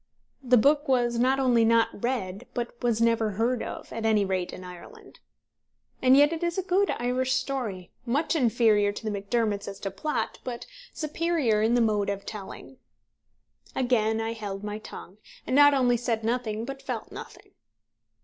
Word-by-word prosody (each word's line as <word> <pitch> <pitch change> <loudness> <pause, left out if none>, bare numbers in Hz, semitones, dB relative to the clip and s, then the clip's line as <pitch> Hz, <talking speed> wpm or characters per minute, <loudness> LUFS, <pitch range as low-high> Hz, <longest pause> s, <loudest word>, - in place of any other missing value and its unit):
The 250 -2 +4
book 290 +6 +3
was 240 -3 +1
not 260 +2 +2
only 245 -3 +3
not 230 -2 +2
read, 205 -6 -3
but 240 -1 -3
was 235 -2 +1
never 230 -2 +2
heard 235 +4 0
of, - - -7
at 225 - -4
any 215 -2 +3
rate 185 -2 -2
in 185 - -9
Ireland. 180 -1 -12 0.8
And 260 +1 +6
yet 290 +3 +5
it 330 - -5
is 345 +1 -1
a 380 - 0
good 380 +2 +1
Irish 255 +2 0
story, 245 -9 -3
much 285 +8 0
inferior 225 -6 +3
to - - -8
The - - 0
Macdermots 205 0 -1
as 200 0 -7
to 195 - -3
plot, 225 +3 -3
but 245 -2 -6 0.3
superior 305 -8 0
in 225 +2 +2
the 240 - +3
mode 210 -3 +1
of 200 0 -4
telling. 210 +5 -9 1.0
Again 225 -4 +1
I 225 0 -2
held 205 -3 -6
my 210 0 -4
tongue, 205 -2 -11 0.3
and 255 - -1
not 290 0 +7
only 245 -2 +3
said 230 -2 -2
nothing 225 -1 -2
but 270 +1 -7
felt 240 -4 -5
nothing. - - -11
235 Hz, 175 wpm, -27 LUFS, 210-260 Hz, 1.0 s, not